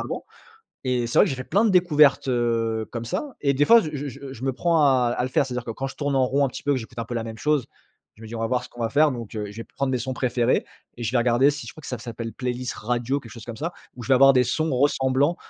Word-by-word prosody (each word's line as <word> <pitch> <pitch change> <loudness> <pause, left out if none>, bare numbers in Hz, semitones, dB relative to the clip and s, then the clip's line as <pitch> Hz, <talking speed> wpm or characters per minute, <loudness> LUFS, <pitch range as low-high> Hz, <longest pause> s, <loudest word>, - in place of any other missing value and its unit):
avant. - - -5 0.6
Et 125 -2 +1
c'est 120 - +2
vrai - - +7
que - - -2
j'ai 135 - -2
fait 130 - -5
plein 200 - +2
de - - +3
découvertes, 150 -7 +4
heu, 115 -2 0
comme 115 -1 -5
ça, 270 - -4
et 140 -1 +2
des 145 +2 +2
fois, 235 +7 +8
je 155 - -4 0.2
je 135 +1 -9
je 125 - -10
me 135 - +1
prends 165 +4 +2
à 130 -4 +3
le - - -5
à - - 0
le 130 - -2
faire, 135 - +2
c'est-à-dire 125 -2 -5
que 115 - -3
quand 135 +4 -4
je - - -9
tourne 145 -2 -1
en 130 -1 +4
rond 140 +2 +1
un 135 - -2
petit - - -9
peu, 145 - +1
que - - 0
j'écoute 120 +1 -11
un 115 - -3
peu 120 - -6
la 115 - -2
même 110 -1 -7
chose, 150 0 0 0.5
je 110 - -14
me - - -8
dis: 115 - -7
«On - - -4
va 115 - 0
voir 125 0 0
ce - - -11
qu'on 120 - -10
va 115 - 0
faire». 150 +4 +4
Donc 115 -3 -7
heu, 105 -1 -4
je 105 - -13
vais 115 - -5
prendre 135 -1 -3
mes 130 - +1
sons 130 +2 -3
préférés, 125 -1 +1 0.3
et, 120 - -6
je 115 - -1
vais 130 - +2
regarder, 120 +4 +4
si 145 +1 -7
je - - -8
crois 155 - -13
que - - -10
ça 125 -3 -4
s'appelle 115 -1 -6
playlist 125 -1 -3
radio, 120 +4 -1
quelque 115 -5 -13
chose 115 0 -11
comme 115 - -6
ça, 165 +5 -3 0.2
où 125 - -9
je - - -8
vais 130 - +6
avoir 135 +1 +7
des 125 - +4
sons 155 +5 0
ressemblants 135 +3 +2
125 Hz, 325 wpm, -24 LUFS, 115-140 Hz, 0.6 s, fois